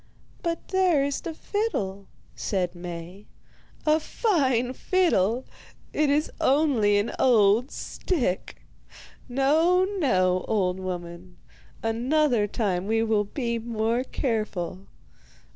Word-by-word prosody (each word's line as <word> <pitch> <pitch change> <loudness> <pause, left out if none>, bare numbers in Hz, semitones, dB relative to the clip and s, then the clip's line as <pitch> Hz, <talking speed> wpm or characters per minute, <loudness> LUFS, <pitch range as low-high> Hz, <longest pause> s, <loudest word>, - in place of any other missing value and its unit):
'But 335 -1 -3
there 365 -7 +3
is 280 0 -2
the 335 - -5
fiddle,' 200 - -3 0.3
said 185 -3 -1
Maie. 175 +2 -8 0.6
'A 310 +1 +4
fine 265 - +1
fiddle! 260 - +1 0.5
It 300 -1 +2
is 295 +2 +1
only 265 -9 +3
an 205 +3 0
old 230 0 +4
stick. 255 - -3 0.7
No, 315 +8 +3
no, 185 - +2
old 190 -4 0
woman, 180 -1 -6 0.5
another 240 0 +2
time 195 -3 -1
we 225 +1 +2
will 220 -2 +1
be 235 +1 -2
more 230 +1 -1
careful. 205 -8 -3
230 Hz, 105 wpm, -26 LUFS, 195-290 Hz, 0.7 s, A